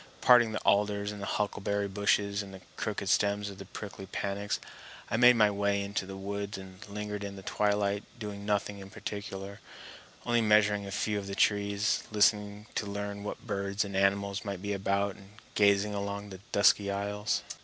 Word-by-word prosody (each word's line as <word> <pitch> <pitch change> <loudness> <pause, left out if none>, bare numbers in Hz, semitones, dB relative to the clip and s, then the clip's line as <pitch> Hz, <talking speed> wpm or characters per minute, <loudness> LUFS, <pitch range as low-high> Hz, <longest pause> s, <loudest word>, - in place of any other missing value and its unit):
Parting 120 -3 +6
the 110 - -3
alders 100 0 +2
and 105 -1 -7
huckleberry 100 0 -1
bushes 100 0 +1
and 95 -1 -9
the 95 - -12
crooked 105 -2 -3
stems 100 +1 +2
of 95 - -12
the 95 - -7
prickly 95 0 -8
panax, 100 +2 -2 0.5
I - - +2
made 125 +1 +8
my 105 -2 +5
way 100 0 +1
into 100 -1 -3
the 95 0 -7
woods, 100 +1 -4
and 95 +1 -10
lingered 105 0 -4
in 100 0 -5
the 95 - -10
twilight 100 0 +1
doing 105 -3 -6
nothing 105 -1 -1
in 95 0 -9
particular, 100 -1 -6 0.7
only 120 -1 +3
measuring 105 -2 +4
a - - -6
few 105 +1 0
of 100 - -7
the 100 - -4
trees, 100 0 +2
listening 105 0 +2
to 105 - -2
learn 100 0 -4
what 105 - -6
birds 100 -1 -1
and 100 -1 -6
animals 100 +1 +1
might 100 -3 -5
be 100 0 -1
about, 100 0 0
and 100 +1 -16 0.2
gazing 100 0 +4
along 100 0 -4
the 95 - -8
dusky 100 0 +4
aisles. 100 +1 -1
100 Hz, 180 wpm, -30 LUFS, 100-105 Hz, 0.7 s, made